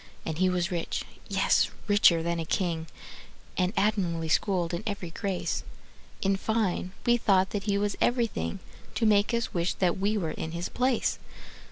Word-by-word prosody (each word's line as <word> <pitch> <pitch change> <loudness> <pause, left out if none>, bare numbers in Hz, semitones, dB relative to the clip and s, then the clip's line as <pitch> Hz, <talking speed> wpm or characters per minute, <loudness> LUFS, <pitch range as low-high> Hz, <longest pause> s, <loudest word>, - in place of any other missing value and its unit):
And 160 0 -3
he 185 0 +4
was 180 0 0
rich, 170 -2 -2 0.2
yes, 195 -1 +3 0.2
richer 195 -5 +5
than 170 0 -1
a - - -1
king, 165 -1 -1 0.7
And 180 0 +1
admirably 175 -6 +1
schooled 180 -1 +1
in 170 - -2
every 200 -5 -4
grace: 190 +1 -2 0.6
In 195 0 +2
fine, 195 -4 -1
we 240 0 +5
thought 190 -4 +3
that 200 -2 -3
he 200 -2 +1
was 205 0 0
everything 230 - 0 0.3
To 225 - +1
make 210 0 +4
us 235 -1 -1
wish 175 0 0
that 180 -1 +1
we 205 +2 +1
were 165 -6 -1
in 160 - -5
his 170 +1 -3
place. 255 -1 +1
190 Hz, 170 wpm, -28 LUFS, 170-205 Hz, 0.7 s, richer